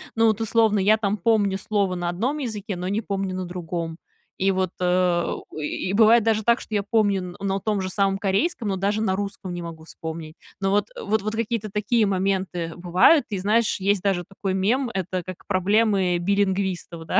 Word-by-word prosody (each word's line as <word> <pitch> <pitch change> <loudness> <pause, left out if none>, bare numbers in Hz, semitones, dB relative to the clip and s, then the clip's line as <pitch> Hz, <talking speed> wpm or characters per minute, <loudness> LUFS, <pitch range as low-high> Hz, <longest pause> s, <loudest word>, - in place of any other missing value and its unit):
ну, 225 0 +4
от, 215 0 -1
условно, 220 -1 +3
я 210 +3 +4
там 210 -1 0
помню 205 -1 +2
слово 200 -2 0
на 175 -1 -2
одном 245 +12 -1
языке, 210 -7 -4
но 180 +1 -4
не 205 +2 0
помню 195 -3 -3
на 185 0 -3
другом. 170 -2 -4 0.4
И 195 +1 +2
вот, 185 -2 0
э, 180 -1 +2 0.2
и 155 - -6
и 165 - -3
и - - -2
бывает 225 +2 +6
даже 220 -1 +1
так, 235 +2 +3
что 215 - -6
я 205 - +1
помню 200 -4 0
на 195 0 -1
том 210 0 0
же 185 0 -2
самом 195 0 +1
корейском, 205 - 0
но 195 - 0
даже 200 +3 0
на 190 -4 +1
русском 195 -2 -5
не 175 - -5
могу 165 -2 -8
вспомнить. 160 -1 -7 0.2
Ну 195 -1 0
вот, 205 +1 +1
вот 215 +1 0
вот 215 +2 -3
какие-то 225 -1 -2
такие 210 +2 +2
моменты 190 -3 -1
бывают. 180 - +4
И 205 - -2
знаешь, 210 +4 +1
есть 195 0 +1
даже 190 -3 0
такой 195 0 -3
мем, 235 +8 +1
это 185 -2 -2
как 185 0 -9
проблемы 195 -1 +2
билингвистов, 190 -2 -1
да, - - +2
195 Hz, 200 wpm, -24 LUFS, 185-215 Hz, 0.4 s, бывает